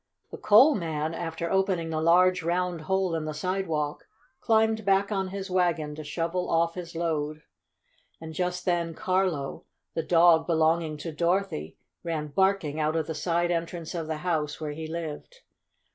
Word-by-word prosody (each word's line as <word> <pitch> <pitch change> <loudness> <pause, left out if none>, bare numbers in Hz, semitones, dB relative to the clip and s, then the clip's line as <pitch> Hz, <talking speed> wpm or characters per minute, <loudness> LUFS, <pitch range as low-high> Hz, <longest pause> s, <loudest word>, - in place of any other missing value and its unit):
The - - -7
coal 240 +9 +7
man, 160 - -2
after 165 0 -4
opening 190 -4 +1
the 155 0 -1
large, 180 +3 +4
round 175 0 -1
hole 190 +2 0
in 160 -1 -2
the 155 -1 -4
sidewalk, 160 -3 -2 0.3
climbed 220 -1 +2
back 195 +1 +2
on 195 -2 0
his 195 0 -6
wagon 170 -5 +1
to 155 +1 -7
shovel 165 +4 -2
off 165 0 +2
his 170 -2 -8
load. 155 -2 -2 0.8
And 160 0 -8
just 180 +2 -2
then 170 -2 0
Carlo, 185 -7 -1 0.3
the 165 - -1
dog 165 -1 +5
belonging 160 -1 +2
to 165 - -3
Dorothy, 170 - -1 0.2
ran 155 -3 -3
barking 190 -3 +1
out 155 +1 0
of 160 -1 0
the 160 - -4
side 175 +2 0
entrance 170 -1 -3
of 165 -3 -4
the 160 -1 -2
house 155 -4 -1
where 155 -2 -4
he 160 +1 -6
lived. 170 - -6
170 Hz, 165 wpm, -27 LUFS, 155-185 Hz, 0.8 s, coal